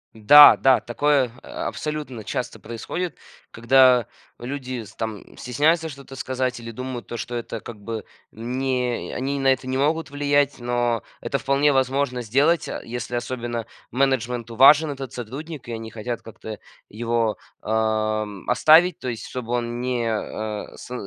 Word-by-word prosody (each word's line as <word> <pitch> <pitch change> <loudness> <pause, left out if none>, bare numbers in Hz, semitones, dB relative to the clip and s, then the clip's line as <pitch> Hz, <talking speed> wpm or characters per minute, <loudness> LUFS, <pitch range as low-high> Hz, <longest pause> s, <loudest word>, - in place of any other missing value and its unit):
Да, 145 +7 +9
да, 130 -1 +4
такое, 135 0 +1
а, - - -6
абсолютно 150 -7 -5
часто 125 +3 -4
происходит, 140 +10 -5 0.3
когда 125 +1 +5 0.3
люди 130 -1 -5
с 110 0 -14
там 110 -3 -6
стесняются 155 +6 +1
что-то 140 -2 -11
сказать 130 -1 -2
или 115 0 -8
думают 125 -2 -6
то, 120 - -5
что 120 - -6
это 115 -2 -5
как 115 -3 -9
бы 110 +1 -5 0.3
не 125 +1 -2
э, - - -7
они 140 +2 -2
на 135 - +1
это 130 -1 +2
не 130 0 -1
могут 150 +2 0
влиять, 145 -1 +1
но 120 -2 0 0.2
это 140 - -2
вполне 140 +2 +2
возможно 130 -1 0
сделать, 140 +8 +2
а, - - -5
если 120 0 -5
особенно 120 -1 -3 0.2
менеджменту 125 -3 -1
важен 145 +5 +7
этот 135 -2 -7
сотрудник 135 +5 -7
и - - -6
они 115 -1 -5
хотят 115 +2 -5
как-то 110 -1 -9 0.3
его, 115 0 -1 0.2
ам, 110 -2 -1
оставить, 160 +8 +5
то - - -6
есть 115 -2 -5
чтобы 120 -2 -5
он 120 0 -2
не, 125 -2 -1
а, 105 -1 -4
сы 125 - -9
125 Hz, 155 wpm, -23 LUFS, 115-140 Hz, 0.3 s, Да